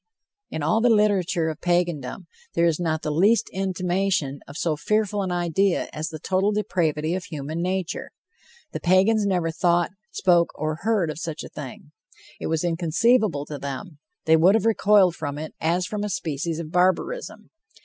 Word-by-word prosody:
In 155 - -4
all 195 +9 +2
the 245 - +4
literature 195 -6 +2
of 155 - -7
Pagandom, 175 -3 -1 0.3
there 170 - +3
is 165 -1 +1
not 160 -2 -1
the 150 - -1
least 200 +9 +3
intimation 185 -5 -1
of 140 - -9
so 165 -2 0
fearful 210 +4 0
an 190 -2 -2
idea 175 +2 +1
as 155 +1 -3
the 160 - -7
total 190 +6 0
depravity 165 -6 0
of 185 -1 -3
human 155 +2 -5
nature. 185 -1 -2 0.6
The - - -4
Pagans 200 +4 +3
never 175 -4 0
thought, 175 0 +1 0.2
spoke, 175 -2 +2
or 155 +1 -2
heard 205 -7 +1
of 155 - -8
such 165 -2 -5
a - - -9
thing. 145 0 -9 0.5
It - - -4
was 160 0 0
inconceivable 175 - +2
to 150 -1 -7
them; 140 +4 -6 0.3
they 160 - +5
would 175 +6 +5
have 225 - +1
recoiled 205 -5 +4
from 145 -2 -4
it 155 +1 -6
as 175 +3 +1
from 210 +1 -4
a 210 - -2
species 160 -2 -3
of 160 -2 -6
barbarism. 185 - 0
175 Hz, 175 wpm, -24 LUFS, 155-195 Hz, 0.6 s, they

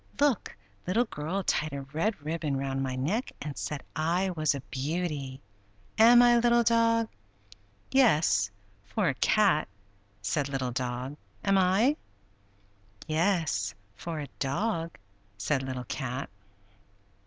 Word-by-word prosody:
Look! 285 -7 +1 0.3
Little 225 +7 +2
Girl 185 0 -3
tied 155 -3 0
a 140 -1 -4
red 160 +10 -2
ribbon 155 -3 -1
round 135 0 -2
my 130 -1 -2
neck, 175 - -1
and 150 -2 -5
said 150 -2 -4
I 175 +4 +1
was 155 -4 +1
a 140 - -5
beauty. 140 0 -3 0.6
Am 240 +2 +8
I, 240 -1 +6
Little 235 0 +4
Dog?" 230 0 +3 0.8
"Yes, 155 - +4 0.3
for 100 +6 0
a - - +1
cat!" 190 +2 +3 0.6
said 140 +7 0
Little 135 -2 -2
Dog. 125 +3 -3 0.3
"Am 195 - +3
I?" 195 +10 +3 1.1
"Yes, 160 - 0 0.2
for 165 +7 -5
a 145 - -5
dog!" 165 +4 -1 0.4
said 130 +7 0
Little 130 -1 -4
Cat. 130 +3 -4
155 Hz, 125 wpm, -29 LUFS, 135-205 Hz, 1.1 s, Am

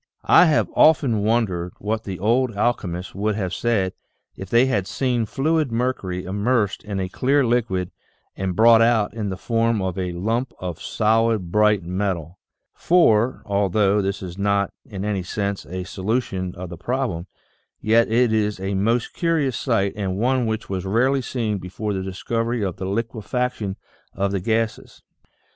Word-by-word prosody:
I - - +7
have 155 -3 +3
often 140 -8 +4
wondered 100 -6 0
what 110 +2 -3
the 95 -2 -4
old 115 +4 +1
alchemists 95 -6 -1
would 105 +1 -1
have 95 -3 -3
said 105 -6 0 0.4
if 95 - -8
they 120 +4 +5
had 100 -8 0
seen 125 -4 0
fluid 155 +2 0
mercury 115 -7 -2
immersed 105 +2 0
in 100 -2 -4
a 95 - -1
clear 135 +8 +1
liquid 110 -7 0 0.4
and 95 -2 -3
brought 115 +2 +6
out 115 -3 +3
in 105 -3 -3
the 95 - -4
form 115 0 0
of 95 -1 -2
a 90 -1 -2
lump 115 +8 -2
of 90 -3 -6
solid, 110 -4 +1
bright 105 -2 +3
metal. 90 -2 -3 0.3
For, 130 -9 +3
although 100 0 +2
this 100 0 -3
is 90 +1 -7
not 100 0 +1
in 100 -1 -5
any 105 -2 -1
sense 100 +2 -3
a 90 +1 -4
so 95 +1 -8
lution 95 -5 -1
of 90 0 -7
the 85 - -8
problem, 100 -4 -2 0.5
yet 115 +1 +3
it 120 0 +3
is 105 -2 0
a 95 +1 -3
most 110 +5 0
curious 160 -7 0
sight 110 -7 0
and 95 -3 -2
one 125 +2 +1
which 110 0 -3
was 95 -2 -3
rarely 125 +8 +2
seen 115 -5 -2
before 100 +4 -4
the 95 - -2
discovery 115 +5 -2
of 90 -4 -4
the 95 - -5
liquefac 115 +4 -2
tion 100 -3 -4 0.4
of 100 0 0
the 100 - -1
gases. 110 +3 -2
105 Hz, 170 wpm, -22 LUFS, 95-115 Hz, 0.5 s, I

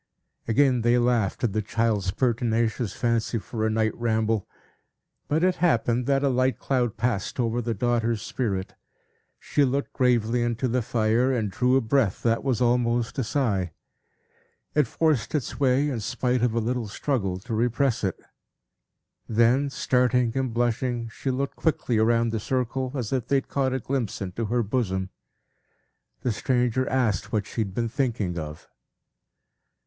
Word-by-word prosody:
Again 125 +1 +3
they 120 +2 +3
laughed 120 -5 +1
at 115 -5 +1
the 110 - +1
child's 105 -2 0
pertinacious 115 -1 0
fancy 115 -1 0
for 110 0 -2
a - - +1
night 110 0 +1
ramble. 110 -2 0 0.8
But 155 +3 +1
it 185 0 +2
happened, 120 -7 +1
that 135 0 +2
a - - +3
light 130 0 +1
cloud 120 -4 -1
passed 115 -1 -1
over 120 0 0
the 115 -1 -2
daughter's 115 0 0
spirit; 100 -7 -3 0.6
she 145 - +1
looked 140 +1 -1
gravely 120 -2 +2
into 120 +2 0
the 125 +1 +1
fire, 115 +3 +1
and 110 -6 -1
drew 125 +5 +2
a 135 - +4
breath 115 -3 +1
that 115 -1 +1
was 130 -3 0
almost 120 0 +1
a - - +1
sigh. 105 - 0 1.0
It 150 -4 +3
forced 155 -1 0
its 140 -3 -3
way, 135 +1 +3
in 120 - -2
spite 125 +2 -1
of 120 -2 +1
a - - +2
little 120 0 -2
struggle 100 -4 -1
to 115 +6 -7
repress 120 +2 +1
it. 95 -3 -1 1.1
Then 120 +5 +3
starting 125 -2 +1
and 130 -2 0
blushing, 120 0 -1
she 135 - -5
looked 135 +2 -2
quickly 150 -8 0
round 115 +1 +3
the 110 - -1
circle, 130 +2 -2
as 125 -3 -3
if 130 -3 -1
they 140 - +2
had 135 - 0
caught 135 -2 0
a 130 - -1
glimpse 130 -3 -2
into 100 +4 -3
her 120 +3 +1
bosom. 95 -4 -1 1.1
The 125 - 0
stranger 125 +2 0
asked 110 -6 0
what 105 -3 0
she 115 - -3
had 95 -3 -4
been 115 -1 0
thinking 110 -9 -1
of. 75 -1 -8
120 Hz, 165 wpm, -25 LUFS, 110-130 Hz, 1.1 s, a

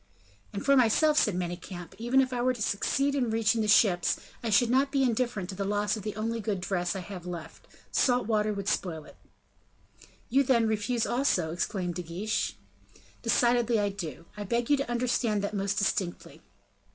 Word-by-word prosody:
"And 200 - -5
for 275 0 +5
myself," 270 +5 +4
said 210 - +2
Manicamp, 175 0 -5
"even 255 +3 +3
were 250 0 0
I - - +2
to 240 - -8
succeed 275 +8 0
in 260 -4 0
reaching 225 0 +2
the 215 - 0
ships, 195 -4 +4 0.2
I 230 - -2
should 230 +3 +4
not 270 +2 +3
be 275 -1 +2
indifferent 235 -6 -1
to 190 - -5
the 200 - -3
loss 205 +1 0
of 215 - -6
the 210 0 -5
only 225 +2 -2
good 210 -3 -2
dress 180 -1 -1
which 190 - -4
I - - -14
have 180 -3 -8
left, 165 -2 -8 0.2
salt 250 -2 +2
water 215 -1 +1
would 200 -1 -4
spoil 160 -6 -2
it." - - -15 1.1
"You, 270 +4 +3
then, 235 -4 +3
refuse 220 +2 0
also?" 215 - +1
exclaimed 180 +1 -2
De 180 - -4
Guiche. 180 +6 -2 0.7
"Decidedly 240 -2 +2
I 205 0 +1
do; 170 -5 -7
I 210 - -5
beg 235 +5 -1
you 290 - +5
to 275 -2 -3
understand 235 -3 0
that 200 - -2
most 200 0 -1
distinctly." 190 -3 -2
215 Hz, 190 wpm, -28 LUFS, 190-240 Hz, 1.1 s, for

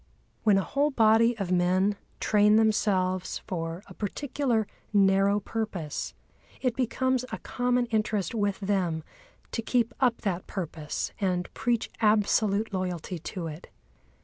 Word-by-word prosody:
When 210 -3 +5
a 195 - +2
whole 285 +7 +1
body 230 -2 +4
of 195 -4 -3
men 185 +3 +3 0.2
train 210 0 +4
themselves 190 -4 +2
for 165 0 -4
a - - -12
particular 240 +1 -1 0.3
narrow 195 0 +4
purpose, 200 -8 -4 0.4
it 250 -3 0
becomes 260 0 0
a - - -3
common 245 0 0
interest 215 -4 -1
with 205 -2 -1
them 185 -5 0 0.5
to 230 - -2
keep 235 0 +1
up 250 -3 +2
that 185 -4 -2
purpose 160 -5 -4
and 180 -2 -1
preach 240 -2 0
absolute 210 -1 +2
loyalty 180 -2 -3
to 175 +2 -5
it. 160 +2 -7
205 Hz, 130 wpm, -28 LUFS, 185-230 Hz, 0.5 s, When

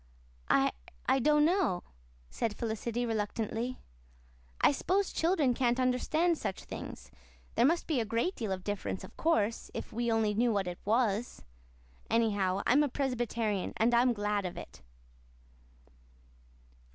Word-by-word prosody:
"I - - +4 0.3
I 270 - +3
don't 300 +3 +4
know," 335 - +1 0.5
said 225 -2 -2
Felicity 235 +1 -2
reluctantly. 225 +2 -2 0.8
"I - - +5
s'pose 375 +7 0
children 325 -6 +2
can't 245 0 +1
understand 310 +7 +1
such 190 - -4
things. - - -8 0.4
There 245 - +4
must 335 +3 +1
be 305 -6 0
a - - +1
great 230 - -1
deal 220 -4 -3
of 185 -1 -3
difference, 205 -2 -3
of - - -11
course, 230 -9 +1
if - - -6
we 235 0 0
only 220 -2 +2
knew 235 +3 +2
what 200 -3 0
it 180 -1 -5
was. 220 - 0 0.7
Anyhow, 200 -4 +1
I - - +3
am 285 - +5
a 295 - +2
Presbyterian, 235 -6 -1
and 230 +2 +3
I'm 245 +1 +5
glad 205 -1 -1
of 180 -2 -5
it." - - -10
235 Hz, 145 wpm, -31 LUFS, 210-260 Hz, 0.8 s, I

